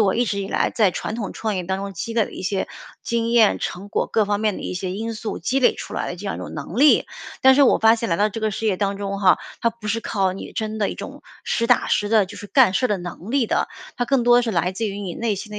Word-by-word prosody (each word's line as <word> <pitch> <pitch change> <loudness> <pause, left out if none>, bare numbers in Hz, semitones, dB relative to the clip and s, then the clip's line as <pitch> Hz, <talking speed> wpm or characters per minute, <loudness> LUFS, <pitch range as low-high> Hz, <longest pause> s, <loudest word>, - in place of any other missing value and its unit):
我 200 -3 +3
一 245 - +2
直 200 -3 -2
以 195 - -3
来 - - +1
在 210 -5 +3
传 210 - -4
统 210 -5 -4
创 215 -3 -3
业 180 - -3
当 190 +1 -1
中 200 0 -5
积 225 +6 -5
累 225 -3 +3
的 - - -11
一 - - -7
些 190 +1 -1 0.3
经 230 0 -1
验、 230 -3 +4
成 195 +3 -5
果， - - -1
各 220 -2 +2
方 205 0 0
面 215 -3 0
的 - - -7
一 - - -4
些 180 0 -3
因 225 +3 -4
素 220 0 -5
积 270 - 0
累 245 - +4
出 - - -8
来 - - -2
的 180 - -5
这 200 - -10
样 - - -2
一 - - -8
种 - - -7
能 160 - -6
力。 295 +1 +5 0.3
但 265 0 +7
是 285 - +6
我 - - +4
发 225 +1 +5
现 230 -1 -3
来 170 - +1
到 210 +3 +2
这 220 +2 -6
个 220 - 0
事 225 - -5
业 195 -3 +2
当 200 0 -1
中 200 0 -4
哈， 185 -2 +5 0.2
它 230 - +2
不 225 -2 -9
是 225 +2 0
靠 195 -4 0
你 190 - -8
真 220 0 -3
的 205 - +1
一 - - -4
种 - - -9 0.2
实 230 - 0
打 245 - +3
实 205 - +1
的 215 -2 +4
就 200 - -11
是 205 - -8
干 250 -4 +4
事 255 - +1
儿 - - -10
的 205 - +1
能 175 +4 -8
力 265 -4 +2
的， - - 0 0.3
它 245 - 0
更 265 -1 +2
多 240 0 +5
是 230 - -1
来 180 -1 0
自 225 +3 -2
于 200 0 -5
你 185 -4 -5
内 230 -3 -1
心 210 +2 -8
的 210 - -5
210 Hz, 335 characters per minute, -22 LUFS, 195-230 Hz, 0.3 s, 但